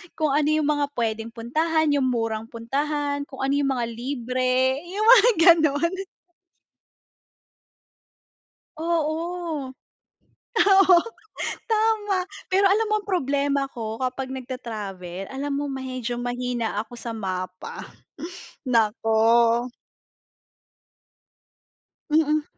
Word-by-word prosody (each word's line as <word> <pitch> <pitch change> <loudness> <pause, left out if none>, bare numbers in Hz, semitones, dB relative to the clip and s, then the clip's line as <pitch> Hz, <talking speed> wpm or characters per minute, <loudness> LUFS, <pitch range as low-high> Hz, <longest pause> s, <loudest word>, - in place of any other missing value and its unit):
kung 310 -3 0
ano 295 +1 +2
yung 310 -1 +2
mga 290 -1 +1
puwedeng 225 -1 -2
puntahan, 310 +7 0
yung 270 -2 +2
murang 225 -2 -1
puntahan, 285 +4 -2
kung 265 -1 -7
ano 270 +1 +1
yung 285 -1 +1
mga 240 -1 -1
libre, 255 +1 0
yung 410 +4 -2
mga 485 0 +8 0.3
ganun. 310 +3 +1 2.9
Oo. 325 -3 -2 0.8
Oo, 390 -3 +6 0.7
tama. 430 -3 +2 0.3
Pero 390 +1 +4
alam 425 +3 +3
mo - - +3
ang 415 - -11
problema 280 -5 0
ko 225 -2 -5
kapag 260 +1 -3
nagta-travel, 205 -8 -6
alam 280 +1 -3
mo 285 0 -2
medyo 255 -2 -4
mahina 245 -3 -2
ako 230 +2 -14
sa 230 -1 -5
mapa. 185 -3 -5 0.8
Naku. 230 +1 +3 2.4
Mm. 305 0 +2
270 Hz, 100 wpm, -24 LUFS, 235-310 Hz, 2.9 s, mga